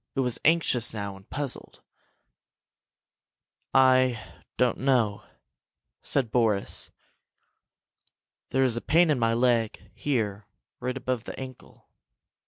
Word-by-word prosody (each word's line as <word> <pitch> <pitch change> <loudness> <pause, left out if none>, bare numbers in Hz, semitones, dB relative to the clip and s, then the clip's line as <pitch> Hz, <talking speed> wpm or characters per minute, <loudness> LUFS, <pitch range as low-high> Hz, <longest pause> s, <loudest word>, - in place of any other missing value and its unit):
It 135 - +1
was 125 -2 0
anxious 130 -8 +2
now, 100 -2 -4
and 95 +1 -17
puzzled. 145 -2 -5 1.9
"I 130 -2 +4 0.4
don't 125 -2 +2
know," 120 -6 +1 0.8
said 130 -6 0
Boris. 110 -5 +1 1.6
"There 135 - +2
is 125 -3 +2
a 120 - -2
pain 170 0 +4
in 140 - +1
my 115 -1 +2
leg 120 -2 0
here, 105 -7 -2 0.3
right 125 +1 -3
above 125 -2 -3
the - - -7
ankle. 130 -1 -11
125 Hz, 110 wpm, -27 LUFS, 115-130 Hz, 1.9 s, I